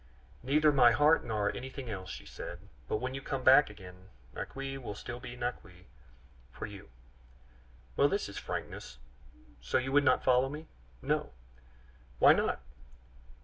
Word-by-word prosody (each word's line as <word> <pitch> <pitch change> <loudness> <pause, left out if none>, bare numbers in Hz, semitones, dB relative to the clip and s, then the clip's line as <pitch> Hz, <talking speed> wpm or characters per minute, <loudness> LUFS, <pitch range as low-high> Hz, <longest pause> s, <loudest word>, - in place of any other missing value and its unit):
"Neither 150 +4 +4
my 125 -4 +6
heart 150 +5 +4
nor 105 -3 -1
anything 130 0 -7
else," 95 -4 -6
she - - -8
said; - - -9 0.2
"but - - 0
when 130 +4 -4
you 135 - -5
come 135 -1 -4
back 135 +1 +7
again, 95 -2 -13 0.2
Naqui 135 0 -5
will 115 -5 -6
still 120 +4 -7
be 120 - -8
Naqui 95 -7 -6 0.7
for - - -6
you." 100 -2 -11 1.1
"Well, 140 - +4
this 200 +5 -1
is 100 - -6
frankness. - - -6 0.6
So 60 - 0
you 130 +1 -2
would 145 +1 +5
not 130 -2 +3
follow 130 +1 +4
me?" 150 +3 -7 0.4
"No." - - -1 0.8
"Why - - +8
not?" - - 0
125 Hz, 150 wpm, -31 LUFS, 105-135 Hz, 1.1 s, Why